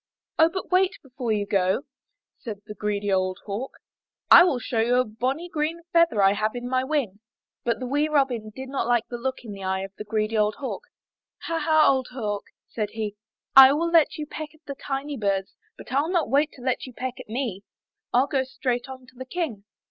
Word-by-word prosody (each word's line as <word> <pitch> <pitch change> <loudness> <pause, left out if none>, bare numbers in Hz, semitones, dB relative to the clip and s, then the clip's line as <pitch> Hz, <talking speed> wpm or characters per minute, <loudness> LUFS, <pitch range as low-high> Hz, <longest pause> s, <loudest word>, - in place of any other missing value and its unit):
"Oh, 320 +1 +7
but 375 +2 -6
wait 370 +1 +3
before 255 -3 -4
you 205 -1 0
go," 190 +5 +1 0.6
said 210 -4 -7
the 210 - -7
greedy 205 -1 -2
old 185 0 +1
Hawk, 215 +6 -4 0.6
"and - - +12
I - - +9
will 350 -8 +2
show 235 -1 -2
you 235 +2 +3
a 255 0 +3
bonny 255 +10 -2
green 325 0 -2
feather 335 -12 +4
I 195 0 +6
have 215 +3 -1
in 245 0 -4
my 255 0 +1
wing." 260 -9 -1 0.4
But 235 -2 0
the 255 - -4
wee 290 +4 +1
Robin 270 -7 +1
did 260 +5 -8
not 270 -3 -2
like 240 -2 +2
the 240 - -5
look 260 +1 -3
in 225 - -8
the 200 -1 -8
eye 190 0 -1
of 195 0 -7
the - - -4
greedy 215 +1 -1
old 210 -1 +2
Hawk. 285 - -5 0.6
Ha! 330 0 -1
Ha! 315 -1 +4
old 260 -2 +2
Hawk," 210 -5 -3 0.2
said 215 -2 -3
he, 215 -2 -3 0.4
"I 265 0 +11
saw 330 +4 +1 0.2
you 305 -3 -5
peck 310 0 -7
at 310 - -25
the 280 - -5
tiny 275 +1 -4
birds, 195 -3 -1 0.2
but - - -11
Fll 285 +6 0
not 345 -5 0
wait 290 +3 +3
to 250 - -13
let 255 0 -1
you 255 - -11
peck 255 +1 -5
at - - -10
me. 225 -5 -3 0.5
ril 250 +2 +4
go 275 -2 0
straight 255 -1 -3
on 260 -1 -9
to 255 0 -20
the 260 +1 -7
King!" 260 - -4
255 Hz, 220 wpm, -25 LUFS, 215-285 Hz, 0.6 s, and